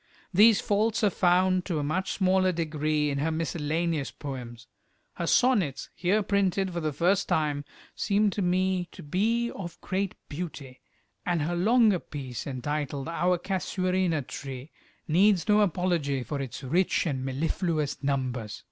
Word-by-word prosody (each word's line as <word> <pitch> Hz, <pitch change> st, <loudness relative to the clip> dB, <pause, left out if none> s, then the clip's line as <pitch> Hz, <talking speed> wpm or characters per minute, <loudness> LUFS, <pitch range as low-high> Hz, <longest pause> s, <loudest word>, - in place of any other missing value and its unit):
These 210 Hz, +3 st, +6 dB
faults 215 Hz, +2 st, +1 dB
are 205 Hz, -, +4 dB
found 185 Hz, +1 st, +3 dB
to 170 Hz, -5 st, -2 dB
a 150 Hz, -, -1 dB
much 180 Hz, +6 st, -1 dB
smaller 185 Hz, -1 st, +3 dB
degree 155 Hz, -3 st, 0 dB
in 140 Hz, -, -2 dB
her 155 Hz, +3 st, 0 dB
miscellaneous 160 Hz, -1 st, -1 dB
poems. 120 Hz, -4 st, -8 dB, 0.5 s
Her 170 Hz, -, -4 dB
sonnets, 210 Hz, -, +2 dB
here 200 Hz, +4 st, +1 dB
printed 195 Hz, -2 st, +1 dB
for 170 Hz, -, -2 dB
the 155 Hz, -2 st, -1 dB
first 180 Hz, +7 st, +1 dB
time, 145 Hz, -2 st, 0 dB, 0.3 s
seem 205 Hz, 0 st, +1 dB
to 205 Hz, -, -3 dB
me 185 Hz, 0 st, +1 dB
to -, -, -10 dB
be 225 Hz, +10 st, 0 dB
of 175 Hz, -4 st, -8 dB
great 195 Hz, 0 st, -2 dB
beauty, 145 Hz, -5 st, -7 dB, 0.4 s
and 170 Hz, -4 st, 0 dB
her 175 Hz, +3 st, -1 dB
longer 215 Hz, +1 st, +4 dB
piece 130 Hz, -6 st, -7 dB
entitled 140 Hz, +2 st, -3 dB
"Our 180 Hz, +2 st, +1 dB
Casuarina 185 Hz, -3 st, -1 dB
Tree," 135 Hz, +2 st, -8 dB, 0.4 s
needs 185 Hz, +3 st, +3 dB
no 210 Hz, 0 st, +5 dB
apology 170 Hz, -8 st, 0 dB
for 140 Hz, +4 st, -4 dB
its 135 Hz, +1 st, -6 dB
rich 175 Hz, +10 st, +1 dB
and 135 Hz, -5 st, -2 dB
mellifluous 155 Hz, +3 st, -1 dB
numbers. 130 Hz, -6 st, -2 dB
170 Hz, 150 wpm, -27 LUFS, 145-190 Hz, 0.5 s, These